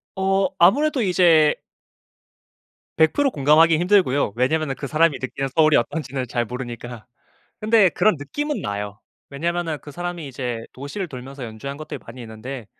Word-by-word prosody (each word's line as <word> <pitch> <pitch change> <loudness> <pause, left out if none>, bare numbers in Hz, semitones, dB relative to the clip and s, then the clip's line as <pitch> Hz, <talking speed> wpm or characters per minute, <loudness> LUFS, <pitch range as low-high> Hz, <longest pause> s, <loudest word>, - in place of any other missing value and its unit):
어 195 0 +1
아무래도 270 - +4
이제 170 -6 +4 1.4
100% 265 - +3
공감하기 155 - +4
힘들고요. 175 - +2
왜냐면은 135 +3 0
그 140 - -6
사람이 155 -1 +2
느끼는 135 +1 -3
서울이 155 -1 +5
어떤지는 130 +1 -2
잘 120 0 -1
모르니까. 120 -1 -7 0.6
근데 215 -2 +5
그런 215 0 +2
느낌은 290 - -3
나요. 105 0 -4 0.3
왜냐면은 165 +2 -2
그 145 - -10
사람이 175 0 -5
이제 120 -3 -4
도시를 145 +8 -6
돌면서 135 0 -8
연주한 115 +5 -7
것들이 155 - -7
많이 115 +2 -10
있는데 115 +2 -8
150 Hz, 345 characters per minute, -22 LUFS, 125-175 Hz, 1.4 s, 서울이